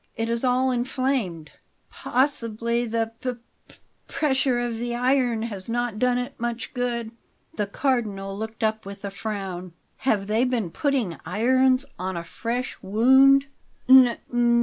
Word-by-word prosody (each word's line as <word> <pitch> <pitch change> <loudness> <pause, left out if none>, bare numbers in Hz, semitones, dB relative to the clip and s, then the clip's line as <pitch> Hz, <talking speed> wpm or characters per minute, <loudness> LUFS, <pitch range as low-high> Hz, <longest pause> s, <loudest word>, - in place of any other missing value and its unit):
"It 225 0 -2
is 235 +1 -1
all 255 +1 +2
inflamed." 245 - -1 0.4
"Possibly 235 -3 0
the 225 0 -1
p 255 -1 -2 0.3
p - - -17 0.3
pressure 265 -4 +1
of 240 -2 -2
the 240 0 -2
iron 250 -2 +1
has 205 -3 -6
not 240 -2 -1
done 250 0 +2
it 250 +2 -5
much 235 -1 -3
good." 240 -3 -2 0.4
The 210 -2 -1
Cardinal 205 -5 -1
looked 220 +2 -6
up 220 0 0
with 200 +1 -9
a 200 - -4
frown. 195 -4 -5 0.2
"Have 210 -7 0
they 215 +4 +1
been 240 -9 -1
putting 255 - -1
irons 255 +5 +2
on 185 0 -3
a 170 - -4
fresh 240 +7 -4
wound?" 265 +7 +5
235 Hz, 140 wpm, -24 LUFS, 210-255 Hz, 0.4 s, wound